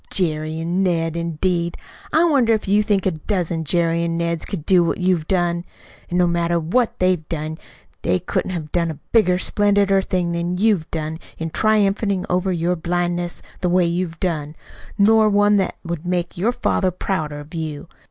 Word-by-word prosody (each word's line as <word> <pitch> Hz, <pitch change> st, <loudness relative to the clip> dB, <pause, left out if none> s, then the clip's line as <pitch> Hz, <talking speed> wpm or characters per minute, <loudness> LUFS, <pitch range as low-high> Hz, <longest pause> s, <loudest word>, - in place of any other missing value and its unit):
Jerry 155 Hz, -3 st, -1 dB
an' 170 Hz, +3 st, -1 dB
Ned, 165 Hz, -3 st, 0 dB
indeed! 170 Hz, +1 st, -1 dB, 0.3 s
I 320 Hz, -, +4 dB
wonder 270 Hz, -9 st, +3 dB
if 215 Hz, -, -1 dB
you 205 Hz, +2 st, +4 dB
think 205 Hz, -3 st, +1 dB
a 190 Hz, -, +3 dB
dozen 170 Hz, 0 st, -2 dB
Jerrys 170 Hz, +1 st, +1 dB
an' 165 Hz, 0 st, -1 dB
Neds 170 Hz, -1 st, -1 dB
could 160 Hz, -6 st, -5 dB
do 180 Hz, -2 st, +5 dB
what 165 Hz, -, 0 dB
you've 180 Hz, -4 st, +1 dB
done! 175 Hz, -2 st, +1 dB, 0.5 s
An' 175 Hz, -, -1 dB
no 180 Hz, -, +4 dB
matter 170 Hz, 0 st, +1 dB
what 220 Hz, +10 st, 0 dB
they 185 Hz, 0 st, +3 dB
done, 155 Hz, 0 st, -5 dB, 0.4 s
they 90 Hz, -, +1 dB
couldn't -, -, -2 dB
have 160 Hz, -5 st, -5 dB
done 170 Hz, -1 st, +1 dB
a 155 Hz, -2 st, -6 dB
bigger, 185 Hz, -6 st, +4 dB
splendider 200 Hz, 0 st, +2 dB
thing 180 Hz, -2 st, -1 dB
than 170 Hz, +1 st, -2 dB
you've 200 Hz, -5 st, +2 dB
done 160 Hz, 0 st, -4 dB, 0.2 s
in 165 Hz, 0 st, -4 dB
triumphating 200 Hz, -2 st, +2 dB
over 185 Hz, +1 st, +1 dB
your 175 Hz, 0 st, 0 dB
blindness 175 Hz, +1 st, -2 dB, 0.2 s
the 180 Hz, -, 0 dB
way 180 Hz, 0 st, +3 dB
you've 170 Hz, -1 st, -2 dB
done, 155 Hz, -4 st, -2 dB, 0.4 s
nor 215 Hz, +1 st, +5 dB
one 205 Hz, 0 st, +4 dB
that 190 Hz, -, 0 dB
would 170 Hz, -2 st, -4 dB
make 175 Hz, -1 st, -2 dB
your 205 Hz, +7 st, +1 dB
father 190 Hz, -5 st, 0 dB
prouder 160 Hz, -5 st, -3 dB
of 145 Hz, +3 st, -12 dB
you! 155 Hz, -2 st, -5 dB
175 Hz, 180 wpm, -21 LUFS, 165-195 Hz, 0.5 s, do